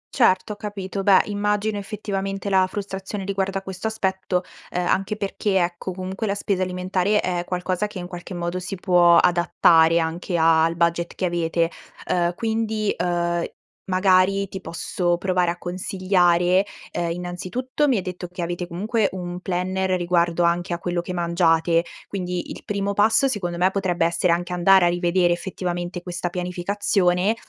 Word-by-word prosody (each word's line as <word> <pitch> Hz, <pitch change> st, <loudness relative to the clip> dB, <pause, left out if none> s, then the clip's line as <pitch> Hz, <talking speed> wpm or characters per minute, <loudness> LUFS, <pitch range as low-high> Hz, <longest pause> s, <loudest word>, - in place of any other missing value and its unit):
Certo, 210 Hz, -4 st, +3 dB
ho -, -, -9 dB
capito. 200 Hz, -2 st, -5 dB
Beh, 195 Hz, -1 st, +6 dB
immagino 210 Hz, 0 st, -1 dB
effettivamente 195 Hz, -1 st, -4 dB
la 190 Hz, -1 st, +4 dB
frustrazione 195 Hz, 0 st, -5 dB
riguardo 195 Hz, 0 st, -1 dB
a 195 Hz, -, -5 dB
questo 190 Hz, +3 st, -5 dB
aspetto, 190 Hz, -4 st, -1 dB, 0.3 s
uhm, 180 Hz, 0 st, 0 dB
anche 195 Hz, +4 st, 0 dB
perché 200 Hz, -1 st, -1 dB
ecco, 175 Hz, +1 st, -1 dB
comunque 190 Hz, +4 st, -4 dB
la 200 Hz, -, 0 dB
spesa 200 Hz, -2 st, -1 dB
alimentare 185 Hz, +2 st, 0 dB
è 175 Hz, -1 st, -1 dB
qualcosa 185 Hz, +2 st, -1 dB
che 205 Hz, -, -10 dB
in 175 Hz, -, -5 dB
qualche 180 Hz, +1 st, -8 dB
modo 175 Hz, +1 st, -3 dB
si 185 Hz, +2 st, -5 dB
può 175 Hz, -2 st, +4 dB
adattare 170 Hz, -1 st, +4 dB
anche 170 Hz, +2 st, -1 dB
al 165 Hz, 0 st, +4 dB
budget 170 Hz, 0 st, 0 dB
che -, -, -1 dB
avete. 170 Hz, -1 st, 0 dB, 0.4 s
Uhm, 175 Hz, -1 st, +1 dB
quindi, 220 Hz, -1 st, -1 dB
uhm, 175 Hz, -1 st, 0 dB, 0.4 s
magari 190 Hz, +1 st, +3 dB
ti 190 Hz, 0 st, -7 dB
posso 175 Hz, +1 st, -1 dB
provare 180 Hz, -1 st, +1 dB
a 175 Hz, -, -6 dB
consigliare, 180 Hz, 0 st, +2 dB, 0.3 s
uhm, 170 Hz, -1 st, -1 dB
innanzitutto 185 Hz, -, -2 dB
mi 250 Hz, -, +3 dB
hai -, -, 0 dB
detto 180 Hz, 0 st, -6 dB
che 180 Hz, 0 st, -7 dB
avete 175 Hz, +1 st, -3 dB
comunque 205 Hz, +5 st, 0 dB
un 180 Hz, -1 st, -6 dB
planner 185 Hz, +1 st, -1 dB
riguardo 175 Hz, -1 st, +1 dB
anche 175 Hz, +1 st, +1 dB
a -, -, -1 dB
quello 175 Hz, 0 st, -2 dB
che 180 Hz, -, -7 dB
mangiate, 170 Hz, -1 st, +2 dB, 0.2 s
quindi 180 Hz, -2 st, -4 dB
il -, -, -9 dB
primo 200 Hz, 0 st, -2 dB
passo 220 Hz, +6 st, +4 dB
secondo 185 Hz, -9 st, -2 dB
me 185 Hz, +2 st, +3 dB
potrebbe 185 Hz, -4 st, 0 dB
essere 170 Hz, +1 st, +1 dB
anche 175 Hz, +1 st, -1 dB
andare 180 Hz, +1 st, +5 dB
a -, -, +5 dB
rivedere 175 Hz, 0 st, +2 dB
effettivamente 175 Hz, 0 st, -4 dB
questa 175 Hz, 0 st, -4 dB
pianificazione, 180 Hz, +2 st, 0 dB
180 Hz, 160 wpm, -23 LUFS, 175-195 Hz, 0.4 s, Beh